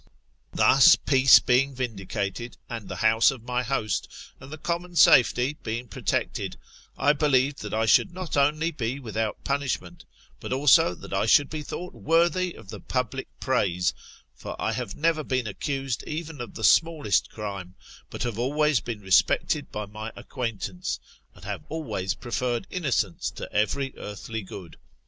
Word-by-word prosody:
Thus 135 0 +6
peace 135 -1 +6
being 130 +2 +2
vindicated, 115 -1 -4
and 115 -4 -7
the - - -4
house 110 +1 +5
of 130 -4 -5
my 125 0 -1
host, 115 -5 -1 0.3
and 130 +2 -12
the 155 - -6
common 175 +3 -3
safety^ 130 -3 +5
being 120 +2 -4
protected, - - -2 0.4
I 145 - +4
believed 140 -2 +1
that 105 - -6
I 110 +1 +1
should 140 - +4
not 185 -1 -5
only 150 +4 +2
be 130 -2 -3
without 110 -4 -3
punishment, 130 -11 -3 0.3
but - - -7
also 130 -9 +4
that - - -10
I - - +1
should 145 -1 +5
be 155 -1 -4
thought 180 +4 -6
worthy 175 +2 +1
of 105 - -14
the 105 -1 -7
public 130 +3 -3
praise; 90 -9 +1 0.4
for - - -8
I - - 0
have 100 - -4
never 160 0 +1
been 130 -3 -1
accused 135 +3 -3
even 155 -2 -5
of 120 - -8
the 110 - -7
smallest 160 -9 +3
crime, 100 -4 -7 0.3
but - - -5
have 115 -2 -3
always 145 +2 +2
been 115 -3 -6
respected 95 -1 +2
by 105 0 -4
my 110 +2 -7
acquaintance, 115 -7 -4 0.4
and - - -14
have - - -4
always 110 - -3
preferred 120 - -2
innocence 130 - -1
to - - -7
every 130 +6 0
earthly 105 +2 -6
good. 95 -3 -10
125 Hz, 160 wpm, -26 LUFS, 110-145 Hz, 0.4 s, Thus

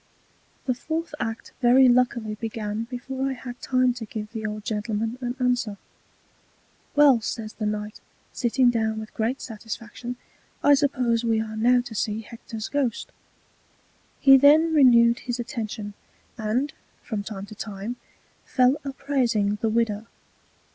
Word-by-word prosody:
The 255 - +1
Fourth 320 +7 -4
Act 225 0 -4
very 255 +2 +6
luckily 240 -3 +2
begun 220 0 -4
before 265 +2 -3
I - - -2
had 245 -1 -9
time 255 -1 +2
to 240 -2 -7
give 215 0 -6
the 220 -2 -4
old 210 0 -6
Gentleman 220 +2 -2
an 245 0 -3
Answer: 245 -5 0 1.2
Well, 285 -5 +6
says 220 0 -4
the 215 - -3
Knight, 210 0 -4 0.3
sitting 245 0 +3
down 220 -2 0
with 220 0 -9
great 230 +4 -1
Satisfaction, 230 +2 -7 0.5
I 290 - +7
suppose 250 -5 +2
we 225 -1 +2
are 220 0 -4
now 245 +3 +4
to 240 -2 -9
see 215 0 -1
Hector's 225 -1 -7
Ghost. 270 -6 -2 1.1
He 270 -1 +8
then 305 +4 +6
renewed 240 -4 +6
his 245 0 -4
Attention, 225 -4 -5 0.4
and, 240 +5 -1 0.3
from 215 -3 -3
time 200 -1 -6
to 205 - -11
time, 210 +3 -6 0.5
fell 255 +2 +3
a 275 -1 -4
praising 230 -8 0
the 225 - +1
Widow. 225 -1 0
235 Hz, 145 wpm, -25 LUFS, 220-255 Hz, 1.2 s, He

